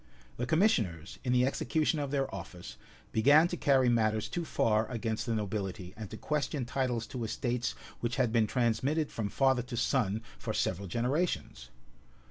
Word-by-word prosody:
[*] 60 +1 -27
The 125 - -2
commissioners, 110 - +1
in 125 - 0
the 125 0 +4
execution 155 +3 0
of 145 -1 -2
their 135 -1 -1
office, 90 -2 -8 0.4
began 145 +9 +6
to 175 - -2
carry 135 -6 +3
matters 110 -2 +2
too 175 - -2
far 110 -7 +1
against 115 -2 -2
the 115 - 0
nobility, 95 -3 -3
and 110 -3 -7
to - - -7
question 150 -3 -1
titles 125 -2 -1
to 125 -2 -5
estates 120 +2 -2 0.2
which 120 +1 -2
had 125 -4 +2
been 115 -2 +3
transmitted 130 +7 +1
from 105 -3 -3
father 130 0 +3
to 125 0 -6
son 115 -3 +1 0.2
for - - -3
several 95 +2 -1
generations. 120 - -1
120 Hz, 170 wpm, -31 LUFS, 110-135 Hz, 0.4 s, began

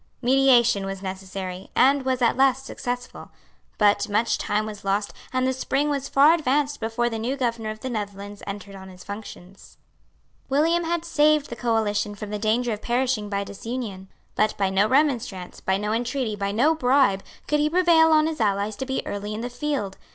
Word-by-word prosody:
Mediation 240 -5 +4
was 195 0 -6
necessary, 190 -1 -6
and 275 +2 +4
was 260 -1 0
at 235 - +3
last 270 0 +2
successful. 245 -2 -5 0.5
But 205 -1 +3
much 215 +3 +1
time 210 +1 0
was 210 -1 -8
lost; 200 +1 -1 0.2
and 255 0 0
the 260 - +1
spring 270 +3 -1
was 275 -1 -2
far 290 +4 +6
advanced 290 -2 0
before 230 +2 -1
the 225 -2 -3
new 250 +5 -2
Governor 230 -4 -2
of 215 0 -7
the 260 - -4
Netherlands 205 -2 -6
entered 200 0 -7
on 190 -1 -10
his 180 -1 -13
functions. 200 -2 -10 0.7
William 325 +5 +2
had 340 0 -1
saved 305 -3 +2
the - - -4
coalition 215 -3 0
from 205 0 -7
the 210 - -3
danger 225 +3 +1
of 210 - -6
perishing 240 -3 0
by 200 0 -1
disunion. 200 -2 -6 0.2
But 215 0 +1
by 195 -1 +1
no 195 +2 +3
remonstrance, 245 -9 0
by 190 0 +1
no 210 +1 -2
entreaty, 240 -1 -1
by 200 -1 -2
no 255 +10 +3
bribe, 255 -9 +3 0.3
could 300 - +1
he 300 +1 +2
prevail 335 -2 +5
on 310 -1 +5
his 315 -5 -3
allies 205 0 0
to 265 - -4
be 265 - -2
early 205 +1 -4
in 220 - -5
the 245 +1 -5
field. 245 -7 -3
230 Hz, 190 wpm, -24 LUFS, 205-270 Hz, 0.7 s, far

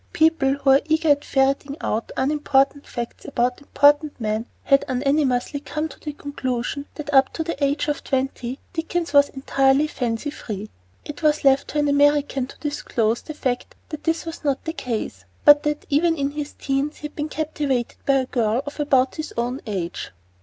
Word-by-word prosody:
People 315 -4 +3
who 275 -1 +2
are 270 +1 +6
eager 315 0 +1
at 285 0 +4
ferreting 275 +1 +1
out 225 +2 -2
unimportant 280 0 +1
facts 240 -1 -6
about 250 0 -1
important 290 +1 +3
men 220 +1 -2 0.2
had 275 0 +4
unanimously 275 0 +1
come 305 +2 -3
to - - -13
the 300 - -5
conclusion 280 -1 -3
that 290 -1 -6
up 270 -1 +5
to 325 - -2
the 315 -3 -3
age 280 +2 +1
of 295 +2 -2
twenty 265 -2 -2 0.2
Dickens 330 -1 -2
was 285 0 +6
entirely 270 +1 +2
fancy 250 -1 -2
free. 215 -7 -7 0.3
It 295 - -7
was 305 -1 +2
left 275 0 +4
to - - -4
an 295 0 +2
American 285 -2 +3
to - - -13
disclose 240 -6 -1
the 310 - -8
fact 250 -4 -3
that 305 - -7
this 325 +1 0
was 330 -1 -7
not 280 -2 -1
the 320 - -2
case, 220 - -4 0.2
but 290 0 +9
that 295 0 -2
even 325 +3 +3
in 280 0 -1
his 295 0 -5
teens 275 +2 -2
he - - -18
had 300 - -7
been 300 +1 -3
captivated 295 -6 -2
by 275 - +5
a 265 -1 +2
girl 235 0 0
of 285 +1 -8
about 265 -3 +2
his 310 0 -5
own 245 +3 -1
age. 180 -5 -4
280 Hz, 190 wpm, -23 LUFS, 260-295 Hz, 0.3 s, but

